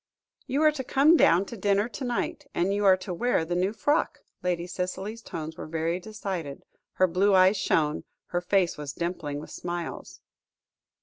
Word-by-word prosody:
"You 280 +4 +1
are 310 - +6
to 285 -3 -5
come 285 +6 +5
down 185 - +5
to 235 - -8
dinner 205 +1 +1
to 255 +3 -7
night, 245 -1 -2
and 185 +3 +1
you 205 0 0
are 190 -1 +7
to 185 0 -6
wear 205 -3 +1
the 175 - -3
new 185 +3 +1
frock," 290 +8 0 0.2
Lady 175 -1 -1
Cicely's 190 +5 -4
tones 160 -5 -6
were - - -7
very 165 +2 -1
decided, 185 -8 -5 0.3
her 185 - +4
blue 190 +3 +3
eyes 185 +2 +5
shone, 155 -4 +1 0.2
her 175 - -1
face 180 -3 +1
was 145 -2 -5
dimpling 165 -4 -3
with 150 - -10
smiles. 175 -1 -6
185 Hz, 180 wpm, -27 LUFS, 170-210 Hz, 0.3 s, are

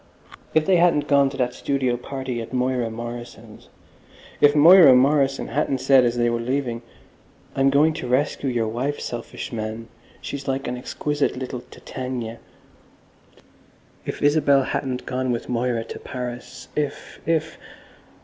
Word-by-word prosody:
If 155 -1 +4
they 185 +1 +4
hadn't 170 -4 +3
gone 140 -1 +4
to 135 - -8
that 125 -2 0
studio 135 -3 -1
party 130 -1 -5
at 115 - -9
Moira 125 -2 0
Morrison's—if 120 +4 -4
Moira 160 -2 +8
Morrison 135 +1 +2
hadn't 135 +1 0
said 130 0 +4
as 120 0 0
they 120 0 +2
were 120 0 0
leaving, 120 -1 -2 0.7
"I'm 135 0 +3
going 150 +3 +4
to 140 -5 -5
rescue 135 +2 0
your 120 -3 0
wife, 130 +6 -2
selfish 120 +1 -6
man. 110 +1 -5 0.3
She's 140 -1 -6
like 135 0 -2
an 125 - -2
exquisite 145 +3 -2
little 130 -1 -5
Titania"—if 125 +1 -10
Isabel 145 -2 +4
hadn't 130 -1 -3
gone 130 0 -2
with 120 - -3
Moira 120 -1 0
to - - -9
Paris—if—if.... 145 +5 -4
130 Hz, 130 wpm, -23 LUFS, 120-140 Hz, 0.7 s, Moira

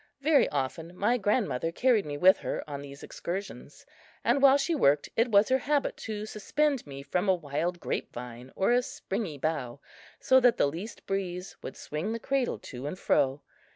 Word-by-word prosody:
Very 295 0 +4
often 155 +5 -3
my 235 +6 +2
grandmother 200 - 0
carried 230 -1 +2
me 145 -1 -4
with 185 +5 +6
her - - -4
on 140 -1 -5
these 140 0 -10
excursions; 190 +4 -6 0.4
and 280 - +2
while 275 0 +7
she 285 +4 0
worked 145 - +3
it 230 +2 +2
was 205 +1 +5
her 260 +1 +3
habit 285 +1 0
to 215 -1 -5
suspend 270 - -1
me 140 -1 -8
from 180 +7 -1
a 190 - +5
wild 170 +2 -3
grape - - -3
vine 125 +1 -9
or 195 - +2
a 245 +1 +4
springy 195 -9 -4
bough, 140 -4 -2 0.4
so 260 - +5
that 245 -2 +4
the - - +4
least 170 +10 -6
breeze 185 -2 -3
would - - -8
swing 160 +9 -4
the 230 - -3
cradle 265 +1 0
to 130 +2 -8
and 165 - -5
fro. 135 -4 +1
190 Hz, 190 wpm, -29 LUFS, 145-240 Hz, 0.4 s, while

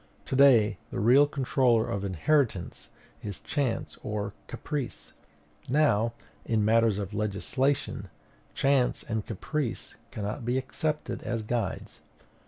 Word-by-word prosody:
To - - -3
day 120 -7 +5
the - - -4
real 130 +8 +6
controller 130 -5 +2
of 100 0 -3
inheritance 100 - 0 0.3
is 100 -3 -5
chance 140 -6 -2
or 105 -1 -3
caprice; 145 -5 -5 0.6
now, 120 -6 +3 0.3
in 110 -2 +1
matters 115 -1 +4
of 100 -1 -4
legislation, 105 +2 -1 0.5
chance 135 -2 +2
and 110 -2 -2
caprice 120 - -4 0.2
cannot 105 +2 -4
be 120 +3 0
accepted 150 +4 -2
as 115 -2 -3
guides. 110 -3 -3
115 Hz, 115 wpm, -28 LUFS, 105-135 Hz, 0.6 s, real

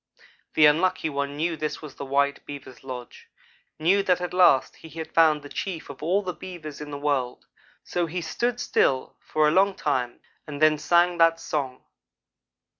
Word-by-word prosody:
The 155 - +6
Unlucky 165 +2 +2
one 140 0 -3
knew 165 +2 0
this 155 -1 -4
was 150 -3 -9
the 140 - -7
white 140 +1 0
Beaver's 140 -3 -10
lodge 125 -2 -9 0.5
knew 180 +6 +3
that 185 -2 +2
at 180 0 -4
last 175 -8 +4
he 160 - -13
had 160 +1 -8
found 155 -3 +4
the - - -8
chief 165 -1 -5
of 135 - -13
all 190 +6 +1
the 180 -1 -3
Beavers 160 -6 -9
in 150 - -7
the 145 - -5
world; 140 -4 -2 0.4
so 175 -1 -2
he 175 +3 -3
stood 240 +9 -2
still 130 - +1
for 155 -1 +1
a - - +3
long 195 +3 +3
time, 125 -5 -2 0.3
and 145 -1 -6
then 155 -1 +4
sang 175 +3 +3
that 165 0 +4
song. 135 -6 -4
155 Hz, 185 wpm, -25 LUFS, 140-175 Hz, 0.5 s, The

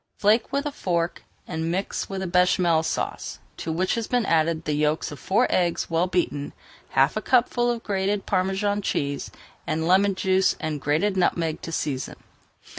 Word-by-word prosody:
Flake 215 +5 +3
with 280 +2 -1
a 295 - -1
fork, 170 -9 -2 0.2
and 160 -1 -2
mix 185 +4 -2
with 190 -2 -4
Bechamel 180 -2 +3
Sauce 160 - -3 0.2
to 160 - -4
which 180 +4 0
has 230 -2 -2
been 245 -3 +1
added 165 -1 +1
the 150 - 0
yolks 150 +1 0
of 145 - -8
four 210 - +2
eggs 175 -2 0
well 165 +2 +2
beaten, 160 -6 -1 0.4
half 135 +2 +4
a 215 - -1
cupful 240 0 +2
of 235 -1 -2
grated 195 0 -1
Parmesan 195 +2 0
cheese, 140 -6 -2 0.4
and 160 0 -1
lemon 195 +2 +4
juice 190 0 +2
and 155 -3 -3
grated 160 +9 +1
nutmeg 165 -3 +1
to 165 - -6
season. 135 -5 -3
180 Hz, 170 wpm, -25 LUFS, 160-200 Hz, 0.4 s, half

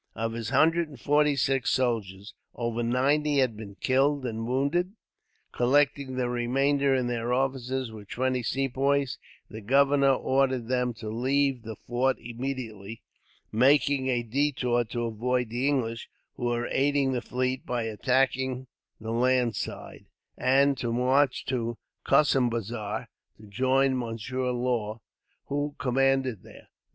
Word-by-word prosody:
Of 115 +1 -2
his 115 -2 -4
hundred 160 +5 +3
and 140 -4 -13
forty 145 +5 +3
six 135 +1 +1
soldiers, 110 -6 -1 0.2
over 120 -1 -2
ninety 140 +5 +1
had 130 -5 +2
been 105 -2 -9
killed 135 +3 +1
and 115 -1 -3
wounded. 140 +9 0 0.6
Collecting 140 +1 +1
the 125 -1 0
remainder, 135 +4 +1
and 125 -2 0
their 120 0 -2
officers, 130 -1 -1
with 105 -3 -11
twenty 130 0 0
Sepoys, 135 +2 0 0.3
the 110 - -9
governor 140 +4 +4
ordered 130 -2 +1
them 125 -2 0
to 110 -1 -8
leave 130 +3 +1
the 110 -1 -7
fort 125 +4 0
immediately; 115 -4 -6 0.5
making 135 +3 +3
a 120 -2 +1
detour 125 -1 0
to 120 +2 -4
avoid 120 +2 -1
the 120 +4 -1
English, 120 -5 -1 0.2
who 120 - -5
were 120 0 0
aiding 140 -1 +2
the 125 -2 -1
fleet 130 +1 -2
by 120 -2 -2
attacking 130 +3 0 0.3
the 110 +1 -5
land 125 -1 +2
side, - - -6 0.3
and 135 +1 +3
to 120 - -2
march 130 +3 +2
to 120 -3 -2 0.3
Kossimbazar 120 -6 +1 0.3
to 110 - -17
join 130 +5 +2
Monsieur 125 +1 -3
Law, 120 -3 -1 0.5
who 145 +1 -2
commanded 130 -3 +1
there. - - -15
125 Hz, 135 wpm, -27 LUFS, 115-135 Hz, 0.6 s, governor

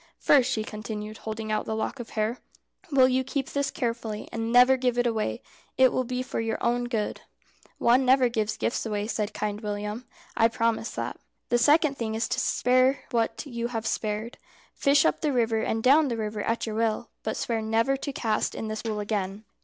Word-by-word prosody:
"First," 270 -4 +4
she 215 - 0
continued, 215 0 -6
holding 220 0 -5
out 215 - 0
the 220 - -1
lock 220 +4 -3
of 240 - -7
hair, 215 +3 0 0.5
"will 265 -2 +6
you 260 0 +1
keep 270 0 -3
this 280 0 0
carefully, 230 -3 -3
and 225 0 -3
never 250 +2 +7
give 250 -2 0
it 245 - +2
away? 215 - -1 0.3
It 260 -1 +5
will 255 - 0
be 250 +1 -2
for 255 - -4
your 225 0 -1
own 240 +1 +1
good." 225 -4 -2 0.6
"One 245 +3 +4
never 255 0 +5
gives 215 -2 -1 0.3
away 210 -2 -2
gifts," 215 - -3
said 210 -2 -2
Kind 210 0 -3
William, 210 +2 -4 0.3
"I 225 - +5
promise 230 0 0
that." - - -4 0.3
"The 240 - +3
second 290 +2 +4
thing 220 -2 -2
is 225 - 0
to - - 0
spare 255 +2 +2
what 230 +4 0
you 235 -4 -3
have 225 -2 -4
spared. 215 +2 -2 0.3
Fish 280 0 +3
up - - +1
the 300 - +1
river 230 -3 +1
and 225 0 -1
down 290 +4 +6
the 235 -3 -2
river 215 -1 -3
at 230 +2 -1
your 220 - -4
will, 225 0 -1
but 220 - -3
swear 230 -2 -1
never 225 +5 +1
to 280 - -4
cast 220 -5 -1
net - - -5
in 220 - -4
this 215 0 -4
pool 215 -2 -3
again." 205 -1 -3
230 Hz, 210 wpm, -27 LUFS, 220-250 Hz, 0.6 s, never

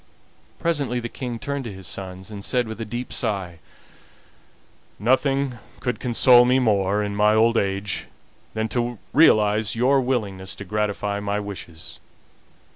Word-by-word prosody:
Presently 145 -7 0
the 120 0 -5
King 120 -2 -5
turned 140 +3 -3
to 115 - -5
his 95 -1 -10
sons, 95 +3 -6
and 100 -1 -7
said, 125 0 0
with 110 0 -6
a - - -3
deep 120 +3 -5
sigh: 95 -7 -2 1.4
"Nothing 130 +2 +1 0.2
could 125 -1 -2
console 125 0 +6
me 125 +1 +3
more 105 -4 +2
in 100 0 -3
my 105 +1 +4
old 115 +1 +4
age 100 -1 -1 0.5
than 110 0 0
to 120 +1 -1 0.2
realize 110 - +4
your 130 +4 +3
willingness 100 -7 -2
to 100 - -8
gratify 105 0 -1
my 100 0 -1
wishes. 85 -5 -8
110 Hz, 145 wpm, -23 LUFS, 100-125 Hz, 1.4 s, console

